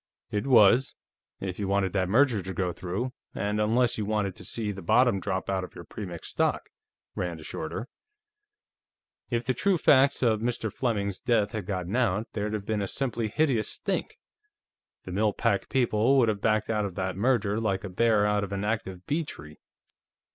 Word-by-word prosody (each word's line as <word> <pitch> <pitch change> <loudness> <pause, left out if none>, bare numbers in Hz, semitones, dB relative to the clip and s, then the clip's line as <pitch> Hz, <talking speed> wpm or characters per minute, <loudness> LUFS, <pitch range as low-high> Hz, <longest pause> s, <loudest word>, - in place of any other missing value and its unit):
"It 105 +5 -1
was, 120 +1 +5 0.4
if 95 -1 -5
you 100 - -1
wanted 95 -1 +1
that 95 -2 0
merger 120 -1 +3
to 95 +1 -6
go 90 -1 -1
through, 100 +10 -4 0.2
and 105 +1 -1
unless 120 +2 +2
you 105 - -1
wanted 105 -3 -1
to - - -10
see 110 -3 -3
the 95 -1 -7
bottom 120 +4 +3
drop 95 0 -2
out 95 -1 -1
of 90 - -9
your 85 - -8
Premix 90 -1 -7
stock," - - -1 0.4
Rand 85 -2 -3
assured 80 0 -6
her. 120 - -5 1.4
"If 120 -1 0
the 130 - +1
true 190 +8 +2
facts 140 -3 +4
of 110 -3 +2
Mr. 115 -2 -2
Fleming's 100 -6 -1
death 110 -4 +1
had 105 -4 -5
gotten 95 0 -3
out, 110 -4 +1
there'd 105 0 -2
have 105 -2 -3
been 110 -1 -1
a 100 - -1
simply 120 -1 -2
hideous 125 -2 +1
stink. - - -3 0.9
The 95 - -8
Mill 105 +2 +1
Pack 100 -4 0
people 125 0 +3
would 120 -4 +4
have 105 -2 -2
backed 110 0 +1
out 105 -1 +1
of 100 -3 -4
that 95 -1 -2
merger 105 -1 +1
like 100 -4 -1
a - - -4
bear 105 +2 +3
out 105 0 +1
of 100 - -5
an 100 0 -2
active 95 -4 -3
bee 160 +3 0
tree.... 75 - -9
105 Hz, 190 wpm, -27 LUFS, 95-115 Hz, 1.4 s, was